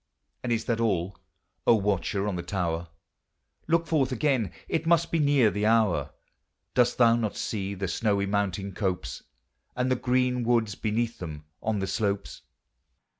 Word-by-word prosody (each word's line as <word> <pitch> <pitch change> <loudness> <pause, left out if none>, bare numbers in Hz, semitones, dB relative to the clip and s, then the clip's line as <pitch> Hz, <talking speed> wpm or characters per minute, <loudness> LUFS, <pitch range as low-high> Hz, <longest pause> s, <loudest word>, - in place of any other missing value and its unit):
And 125 - -3
is 115 -1 0
that 115 -1 0
all, 100 -4 0 0.5
O 115 - +7
watcher 100 -1 0
on 100 - -1
the 85 - -3
tower? 85 -2 -2 0.8
Look 165 +1 +2
forth 145 -5 +1
again; 130 - +1 0.2
it 165 0 -1
must 170 0 +3
be 165 - +2
near 140 -7 +4
the 105 +1 0
hour; 110 -5 +3 0.6
Dost 125 -1 +3
thou 115 -2 +6
not 110 -3 -2
see 100 -2 -3
the 95 0 -3
snowy 100 +2 +1
mountain 100 -1 -1
copes, 95 -2 -2 0.5
And 125 +1 0
the - - +4
green 125 0 +1
woods 115 -3 +2
beneath 115 +3 -2
them 75 -4 -7 0.2
on 110 -1 0
the 95 - -1
slopes? 100 +1 -2
110 Hz, 160 wpm, -27 LUFS, 100-125 Hz, 0.8 s, O